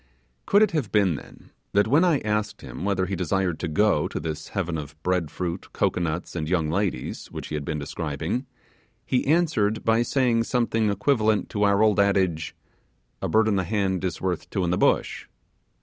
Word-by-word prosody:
Could 205 Hz, +2 st, +5 dB
it 210 Hz, -, +2 dB
have 150 Hz, -, -2 dB
been 100 Hz, -5 st, +3 dB
then, 70 Hz, -, -11 dB, 0.2 s
that 100 Hz, +1 st, +3 dB
when 145 Hz, +9 st, +4 dB
I 170 Hz, -6 st, +3 dB
asked 105 Hz, 0 st, -2 dB
him -, -, -8 dB
whether 95 Hz, -2 st, +1 dB
he 95 Hz, +2 st, -3 dB
desired 90 Hz, -1 st, -1 dB
to 90 Hz, -, -2 dB
go 80 Hz, 0 st, +2 dB
to -, -, -4 dB
this 80 Hz, -1 st, -5 dB
heaven 90 Hz, -4 st, -2 dB
of 75 Hz, 0 st, -8 dB
bread 90 Hz, -4 st, 0 dB
fruit, 90 Hz, +2 st, -5 dB
cocoanuts, 85 Hz, 0 st, -1 dB
and 80 Hz, -2 st, -3 dB
young 80 Hz, -4 st, +1 dB
ladies, 90 Hz, -9 st, -2 dB
which -, -, -8 dB
he -, -, -6 dB
had 75 Hz, -1 st, -2 dB
been 75 Hz, +1 st, -3 dB
describing, 80 Hz, -, -3 dB, 0.6 s
he 125 Hz, -, 0 dB
answered 140 Hz, -10 st, +2 dB
by 115 Hz, +1 st, +3 dB
saying 120 Hz, -2 st, +2 dB
something 115 Hz, -3 st, +1 dB
equivalent 105 Hz, -1 st, +1 dB
to 105 Hz, -, -3 dB
our 100 Hz, 0 st, +4 dB
old 105 Hz, -1 st, +3 dB
adage 95 Hz, -5 st, +1 dB, 0.7 s
'A -, -, -2 dB
bird 110 Hz, 0 st, +3 dB
in 105 Hz, -2 st, +2 dB
the 95 Hz, -, +1 dB
hand 95 Hz, -2 st, -1 dB
is 90 Hz, -3 st, -2 dB
worth 90 Hz, -3 st, -3 dB
two 95 Hz, -, -1 dB
in 85 Hz, -, 0 dB
the -, -, +2 dB
bush'? -, -, +1 dB
100 Hz, 195 wpm, -25 LUFS, 85-110 Hz, 0.7 s, Could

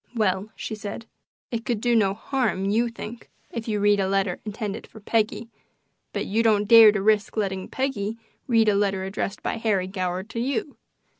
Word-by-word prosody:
"Well," 200 Hz, -2 st, 0 dB
she -, -, -5 dB
said, 215 Hz, +1 st, -6 dB, 0.5 s
"it 230 Hz, -1 st, -2 dB
could 235 Hz, -3 st, -1 dB
do 240 Hz, +1 st, +2 dB
no 200 Hz, -3 st, +3 dB
harm, 220 Hz, -5 st, -1 dB
you 235 Hz, +3 st, +2 dB
think, 230 Hz, 0 st, -9 dB, 0.2 s
if 230 Hz, -1 st, -5 dB
you 210 Hz, -2 st, 0 dB
read 205 Hz, 0 st, +4 dB
a 190 Hz, -, +1 dB
letter 195 Hz, -2 st, 0 dB
intended 210 Hz, -1 st, -5 dB
for 220 Hz, -, -13 dB
Peggy, 220 Hz, +2 st, -1 dB, 0.6 s
but -, -, -3 dB
you 220 Hz, +3 st, +1 dB
don't 210 Hz, -2 st, +3 dB
dare 225 Hz, -1 st, +9 dB
to 200 Hz, -2 st, -2 dB
risk 215 Hz, 0 st, +2 dB
letting 190 Hz, -3 st, -1 dB
Peggy 230 Hz, -5 st, -2 dB, 0.3 s
read 225 Hz, -3 st, +4 dB
a 210 Hz, -, +5 dB
letter 195 Hz, -1 st, +1 dB
addressed 195 Hz, +1 st, -4 dB
by -, -, -2 dB
Harry 210 Hz, -5 st, +1 dB
Goward 185 Hz, 0 st, -3 dB
to 230 Hz, -, -4 dB
you. 270 Hz, +3 st, -2 dB
210 Hz, 190 wpm, -25 LUFS, 195-230 Hz, 0.6 s, dare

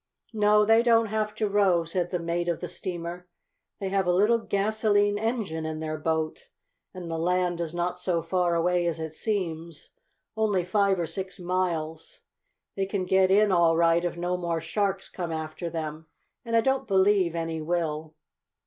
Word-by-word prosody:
"No, 210 Hz, 0 st, +4 dB
they 225 Hz, +1 st, +5 dB
don't 230 Hz, -2 st, +3 dB
have 215 Hz, 0 st, -2 dB
to 215 Hz, -, 0 dB
row," 195 Hz, -4 st, +3 dB
said 175 Hz, +1 st, -2 dB
the 180 Hz, -, -1 dB
mate 170 Hz, 0 st, -2 dB
of 170 Hz, -, -1 dB
the 180 Hz, -, -5 dB
steamer. 175 Hz, +1 st, -5 dB, 0.5 s
"They 195 Hz, -, -3 dB
have 195 Hz, -1 st, 0 dB
a -, -, +4 dB
little 210 Hz, +6 st, +3 dB
gasolene 205 Hz, -1 st, +1 dB
engine 220 Hz, -8 st, -2 dB
in 155 Hz, 0 st, -4 dB
their 155 Hz, -1 st, -4 dB
boat, 160 Hz, 0 st, -2 dB, 0.4 s
and 180 Hz, -2 st, -8 dB
the 165 Hz, -1 st, -3 dB
land 180 Hz, 0 st, 0 dB
is 170 Hz, 0 st, -4 dB
not 175 Hz, +1 st, -2 dB
so 175 Hz, -2 st, 0 dB
far 175 Hz, 0 st, +1 dB
away 175 Hz, +1 st, +1 dB
as 170 Hz, -1 st, -2 dB
it 160 Hz, -1 st, -5 dB
seems, 170 Hz, -7 st, -3 dB, 0.4 s
only 210 Hz, -4 st, +1 dB
five 195 Hz, +1 st, +2 dB
or 170 Hz, -, -1 dB
six 190 Hz, +3 st, -5 dB
miles. 175 Hz, -3 st, -3 dB, 0.5 s
They 195 Hz, -1 st, -1 dB
can 195 Hz, -2 st, -2 dB
get 190 Hz, +1 st, +3 dB
in 205 Hz, +1 st, +4 dB
all 170 Hz, -2 st, +4 dB
right 170 Hz, 0 st, +3 dB
if 175 Hz, -1 st, -2 dB
no 175 Hz, +1 st, -1 dB
more 170 Hz, -2 st, -2 dB
sharks 195 Hz, +4 st, -1 dB
come 175 Hz, -3 st, -5 dB
after 160 Hz, +2 st, -4 dB
them, 160 Hz, -1 st, -5 dB, 0.4 s
and 230 Hz, -2 st, -2 dB
I 230 Hz, -, +5 dB
don't 265 Hz, +1 st, 0 dB
believe 190 Hz, -3 st, +3 dB
any 165 Hz, -1 st, -3 dB
will." 160 Hz, -1 st, -2 dB
180 Hz, 180 wpm, -27 LUFS, 165-200 Hz, 0.5 s, they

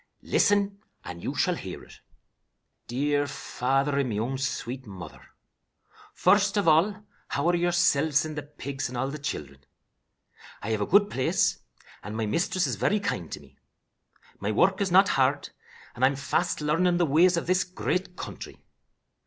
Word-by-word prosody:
"Listen, 200 Hz, -1 st, +2 dB, 0.3 s
and 90 Hz, -1 st, -7 dB
you -, -, -4 dB
shall -, -, +2 dB
hear -, -, -7 dB
it. -, -, -16 dB, 0.9 s
"'DEAR 145 Hz, +4 st, 0 dB
FATHER 135 Hz, +2 st, -1 dB
AND 135 Hz, -3 st, 0 dB
MY 105 Hz, -, -2 dB
OWN 125 Hz, +5 st, -2 dB
SWEET 125 Hz, -1 st, -4 dB
MOTHER: 90 Hz, -6 st, -10 dB, 0.9 s
First 200 Hz, +2 st, +3 dB
of 200 Hz, -, +1 dB
all, 185 Hz, +7 st, +3 dB, 0.2 s
how 140 Hz, +4 st, -1 dB
are 175 Hz, -, +3 dB
yoursilves 160 Hz, -4 st, +2 dB
and 155 Hz, -1 st, -6 dB
the 150 Hz, -, -3 dB
pigs 140 Hz, -3 st, -5 dB
and 125 Hz, -, -6 dB
all 135 Hz, +2 st, -1 dB
the 150 Hz, -, -6 dB
children? 70 Hz, -, -5 dB, 1.0 s
I 110 Hz, -, -2 dB
have 110 Hz, -1 st, 0 dB
a -, -, -1 dB
good 205 Hz, +2 st, +4 dB
place, 130 Hz, -, +1 dB, 0.4 s
and 105 Hz, +2 st, -6 dB
my 110 Hz, -, -1 dB
mistress 170 Hz, -, 0 dB
is -, -, -2 dB
very 210 Hz, -, +1 dB
kind 90 Hz, -, -3 dB
to -, -, -5 dB
me. -, -, -21 dB, 0.8 s
My 105 Hz, -, -1 dB
work 190 Hz, -, +2 dB
is 195 Hz, -, +1 dB
not 190 Hz, +2 st, +5 dB
hard, 135 Hz, +2 st, +1 dB, 0.4 s
and 125 Hz, -, -5 dB
I -, -, +8 dB
am 140 Hz, -, 0 dB
fast 150 Hz, +5 st, -1 dB
learning 170 Hz, +4 st, +2 dB
the 175 Hz, -, +3 dB
ways 170 Hz, +5 st, +4 dB
of 170 Hz, -, -2 dB
this 185 Hz, +1 st, +2 dB
great 180 Hz, 0 st, -3 dB
country. -, -, -8 dB
145 Hz, 170 wpm, -27 LUFS, 130-180 Hz, 1.0 s, I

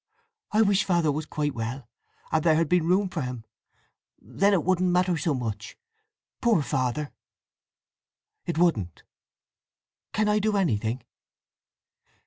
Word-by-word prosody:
"I 215 Hz, +1 st, +4 dB
wish 200 Hz, -1 st, +3 dB
Father 170 Hz, -5 st, +2 dB
was 155 Hz, +2 st, -4 dB
quite 145 Hz, -2 st, -2 dB
well, 120 Hz, +3 st, -5 dB, 0.4 s
and 160 Hz, -1 st, +1 dB
there 160 Hz, -2 st, +4 dB
had 165 Hz, 0 st, +2 dB
been 175 Hz, 0 st, +2 dB
room 190 Hz, +3 st, +3 dB
for 180 Hz, -4 st, -4 dB
him! 125 Hz, -3 st, -5 dB, 0.7 s
Then 200 Hz, +2 st, +1 dB
it 185 Hz, -6 st, +2 dB
wouldn't 185 Hz, 0 st, +2 dB
matter 180 Hz, 0 st, +2 dB
so 155 Hz, -1 st, 0 dB
much! 110 Hz, -4 st, -5 dB, 0.6 s
Poor 225 Hz, -10 st, +3 dB
Father!" 130 Hz, +3 st, -2 dB, 1.4 s
"It 170 Hz, -, -2 dB
wouldn't!" 110 Hz, -, +1 dB, 1.1 s
"Can 215 Hz, 0 st, +1 dB
I 210 Hz, 0 st, +3 dB
do 210 Hz, 0 st, +1 dB
anything?" 120 Hz, -, 0 dB
160 Hz, 130 wpm, -26 LUFS, 130-185 Hz, 1.4 s, I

